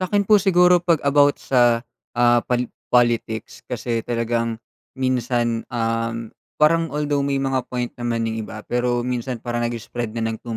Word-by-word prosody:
Sa'kin 200 +2 +1
po 210 0 +5
siguro 180 -2 +5
'pag 170 -2 +3
about 145 0 +4
sa, 120 -2 +2 0.3
ah, 120 0 +4
pal 125 0 +1 0.2
politics 120 -2 +1
kasi 115 -1 -2
talagang 115 0 -1 0.4
minsan, 120 -3 0
um, 115 -1 -2 0.2
parang 165 +2 +3
although 145 0 -1
may 140 0 0
mga 135 -1 -1
point 125 -1 -3
naman 115 -1 -1
yung 115 0 -2
iba, 110 -1 -8
pero 120 0 0
minsan 125 0 -2
parang 120 0 -2
nag-spread 115 0 -5
na 115 - -1
ng 110 - -7
too 115 -2 -5
120 Hz, 160 wpm, -22 LUFS, 115-140 Hz, 0.4 s, po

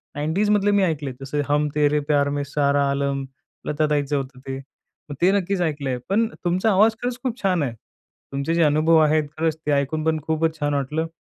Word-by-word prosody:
90sमधले 205 +7 +1
मी 200 -1 +3
ऐकलेत. 150 -6 -1
जसे, 145 +2 -2
हम 150 +1 +2
तेरे 150 0 +3
प्यार 145 -1 +1
में 145 0 -2
सारा 140 -1 +1
आलम, 140 -1 -1 0.4
लता 150 +1 +1
ताईचं 145 -1 0
होतं 135 -1 -6
ते. 135 0 -3 0.5
मग 145 - -5
ते 185 +2 +5
नक्कीच 190 0 -2
ऐकलंय. 145 -6 -1
पण 225 +3 +2 0.2
तुमचा 185 +5 +2
आवाज 215 +3 +4
खरंच 245 0 -2
खूप 250 -2 -3
छान 180 -6 +1
आहे. 120 -4 -2 0.6
तुमचे 140 +4 -1
जे 170 - +3
अनुभव 155 +2 +4
आहेत, 155 0 +3
खरंच 160 -1 0
ते 150 - +1
ऐकून 145 +2 0
पण 160 -1 +1
खूपच 160 0 0
छान 145 0 0
वाटलं. 150 +4 -1
150 Hz, 195 wpm, -23 LUFS, 140-170 Hz, 0.6 s, ते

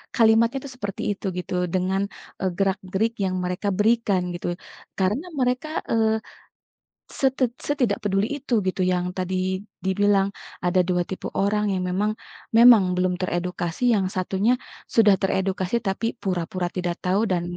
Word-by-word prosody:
kalimatnya 230 +2 +4
itu 280 - -7
seperti 205 -5 -5
itu 205 - -6
gitu, 180 - -4 0.2
dengan, 190 +1 +1 0.4
e - - -3
gerak-gerik 195 +3 0
yang 185 -1 -1
mereka 180 +3 -2
berikan 215 -3 +2
gitu. 175 - -7 0.5
Karena 210 - +1
mereka, 250 +4 +1 0.2
eee, 220 -1 +3 1.0
setid 265 -2 +2 0.2
setidak 250 -9 +1
peduli 195 0 +1
itu, 275 -2 -9
gitu, 185 0 -1
yang 180 -1 0
tadi, 185 0 -2 0.5
dibilang, 195 +1 +3 0.4
ada 180 +1 +2
2 180 -1 +2
tipe 190 - -5 0.2
orang 210 +1 +1
yang 185 - -1
memang 200 +4 +1 0.5
memang 235 -3 +9
belum 180 0 +1
teredukasi, 175 0 -2
yang 195 -3 +1
satunya, 190 +5 +1 0.4
sudah 215 -3 +6
teredukasi 190 0 -1
tapi 195 +3 -1 0.2
pura-pura 180 -1 -2
tidak 175 -1 -1
tahu, 185 +2 +2
dan, 180 -4 0
195 Hz, 140 wpm, -24 LUFS, 185-220 Hz, 1.0 s, memang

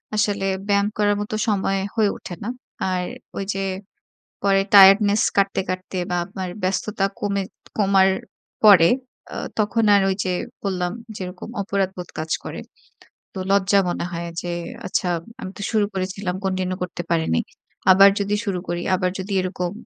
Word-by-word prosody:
আসলে 205 -2 +1 0.2
ব্যায়াম 200 0 +3
করার 205 -1 +3
মতো 210 +1 -4
সময় 195 -2 +1 0.2
হয়ে 215 -3 +3
ওঠে - - -8
না। 230 - -3 0.4
আর 180 -1 0 0.3
ঐযে 195 0 -2 0.8
পরে 195 -1 +4
টায়ার্ডনেস 200 +1 +8 0.2
কাটতে, 195 -1 +2
কাটতে 185 +1 -4
বা, 180 - 0
আপনার 190 -1 -5
ব্যস্ততা 195 +2 0
কমে 200 -1 0 0.4
কমার 195 -2 +4 0.6
পরে 180 -5 +8 0.5
অ - - -3 0.2
তখন 220 +2 +2
আর 200 - +5
ঐযে 190 -1 -1 0.3
বললাম, 180 -3 -1 0.3
যেরকম 180 +3 -7
অপরাধবোধ 190 -3 -2
কাজ 160 0 -4
করে। - - -6 0.7
তো 190 - -5
লজ্জা 200 0 +4
মনে 175 - -2
হয় 170 0 -4
যে, 175 - -4 0.4
আচ্ছা 185 - 0 0.3
আমি 185 - -5
তো - - -7
শুরু 215 -2 +3
করেছিলাম, 185 0 -3
continue 185 -1 -1
করতে 180 -1 -5
পারিনি। 160 - +2 0.5
আবার 195 +1 +8
যদি 200 +1 0
শুরু 195 -3 -1
করি 175 0 -2
আবার 180 0 0
যদি 195 +2 -4
এরকম 180 -1 -3
195 Hz, 150 wpm, -22 LUFS, 185-200 Hz, 0.8 s, টায়ার্ডনেস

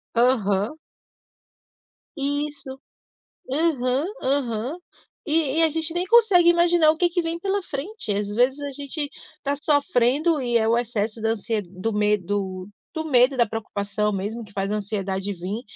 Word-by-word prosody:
Aham. 225 -2 +2 1.4
Isso, 285 -1 -2 0.7
aham, 275 -3 +1 0.2
aham, 260 +1 -1 0.5
e 305 -2 +1
e 330 - +5
a 325 - +5
gente 325 +1 -1
nem 355 +1 0
consegue 405 -5 +5
imaginar 345 -2 +5
o 315 - -5
que 350 +1 +3
que 350 0 -1
vem 330 +1 -3
pela 395 +2 -1
frente. 320 - -5
Às 205 0 -1
vezes, 250 +6 +2
a 285 0 -4
gente 285 +2 -3 0.3
tá 280 0 -1
sofrendo, 290 +1 +2
e 240 -3 -1
é 220 -1 +1
o 230 +1 +3
excesso 225 -2 -2
da 225 - +1
ansie- 225 0 -2
do 185 +4 -4
medo 205 -2 -1 0.2
do 315 -2 -3
medo, 260 -3 +4
da 240 -2 +4
preocupação 210 -1 -2
mesmo, 205 +4 -3
que 205 - -14
faz 195 0 -2
a - - 0
ansiedade 200 -1 -3
vim, 190 +5 -5
250 Hz, 155 wpm, -24 LUFS, 210-310 Hz, 1.4 s, e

